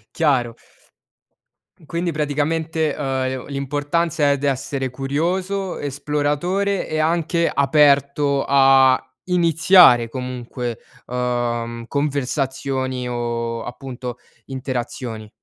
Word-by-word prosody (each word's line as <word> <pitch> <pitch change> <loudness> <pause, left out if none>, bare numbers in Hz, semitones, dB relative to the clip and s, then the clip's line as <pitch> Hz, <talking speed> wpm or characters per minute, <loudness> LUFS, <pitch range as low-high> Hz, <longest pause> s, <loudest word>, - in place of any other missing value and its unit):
Chiaro. 130 -7 +1 1.3
Quindi 170 +2 -2
praticamente, 155 +1 -1
uhm, 150 - -4 0.2
e 130 - -2
o 130 - -7
l'importanza, 145 +2 0
ehm, 140 - +2
d'essere 135 -1 -2
curioso, 175 +9 -2
esploratore 150 +8 -1
e 155 - -2
anche 170 +1 +1
aperto 140 0 +3
a 135 -1 +6 0.3
iniziare 170 -7 +5
comunque, 125 -1 -5 0.3
uhm, 120 -1 -2
conversazioni 135 -2 -2
o 115 -1 -3
appunto 125 -1 -7 0.3
interazioni. 125 -4 -5
140 Hz, 85 wpm, -21 LUFS, 125-155 Hz, 1.3 s, a